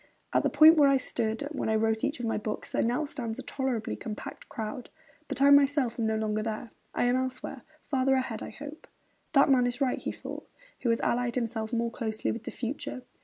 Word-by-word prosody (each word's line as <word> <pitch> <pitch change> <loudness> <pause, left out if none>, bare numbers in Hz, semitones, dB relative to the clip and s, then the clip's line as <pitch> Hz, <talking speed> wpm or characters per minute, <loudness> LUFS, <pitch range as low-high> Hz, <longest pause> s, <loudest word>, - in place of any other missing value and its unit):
'At - - +4
the - - +1
point 310 +2 +8
where 285 -2 +7
I 275 - +5
stood 225 -1 -1
when 290 - -2
I 220 - +2
wrote 220 0 +1
each 280 -1 -1
of 240 - -3
my 225 - 0
books, 210 0 -4
there - - +1
now 245 +7 +1
stands 235 -6 -4
a - - -6
tolerably 260 -5 -2
compact 215 -2 -7
crowd; 225 +3 -5 0.4
but 275 - 0
I 280 - +7
myself 280 -4 +4
am 225 - +1
no 220 - +1
longer 215 0 0
there; 220 +1 -4 0.2
I - - +1
am 245 +1 +3
elsewhere; 260 0 -3 0.3
farther 265 -1 +2
ahead, 255 -4 -2
I - - -5
hope.' 295 +2 -10 0.5
'That 275 -1 +6
man 250 -2 +5
is 245 0 -3
right,' 265 -2 0
he - - -2
thought, - - -8 0.3
'who 240 - 0
has 230 - +2
allied 240 0 0
himself 225 -3 -2
most 235 -1 -1
closely 220 -2 -2
with 230 - -6
the - - -3
future.' 260 +1 -5
245 Hz, 220 wpm, -29 LUFS, 225-275 Hz, 0.5 s, point